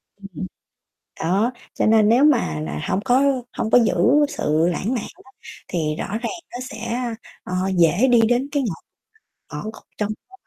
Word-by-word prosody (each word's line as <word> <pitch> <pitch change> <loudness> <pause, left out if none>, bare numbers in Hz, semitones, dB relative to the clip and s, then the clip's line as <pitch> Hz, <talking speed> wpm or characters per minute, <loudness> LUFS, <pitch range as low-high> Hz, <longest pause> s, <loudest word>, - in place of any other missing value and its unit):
Ừm, 200 - -15
ừm. 195 - -8 0.9
Đó, 195 +9 +1 0.2
cho - - 0
nên 215 -1 +5
nếu 245 +5 +5
mà 80 - +3
nà 75 -1 -4
hông 190 - +1
có 260 +2 +4 0.3
hông 220 - -1
có - - +7
giữ - - +1 0.4
sự 155 - +1
lãng 215 +8 -2
mạn 230 - -3 0.2
á 265 - -20 0.4
thì 155 -4 -1
rõ - - -3
ràng 225 +4 -3 0.2
nó 245 - -6
sẽ, 235 +2 -4 0.4
ờ, 180 - -6 0.2
dễ 175 +9 +4
đi 235 -2 +6
đến 245 +4 +2
cái 285 -3 0
ngõ 195 -8 -2 0.8
ngõ - - -5
cụt 220 +1 -8 0.2
trong 210 - 0 0.2
mối 385 0 -17
quan - - -55
220 Hz, 190 wpm, -22 LUFS, 175-245 Hz, 0.9 s, có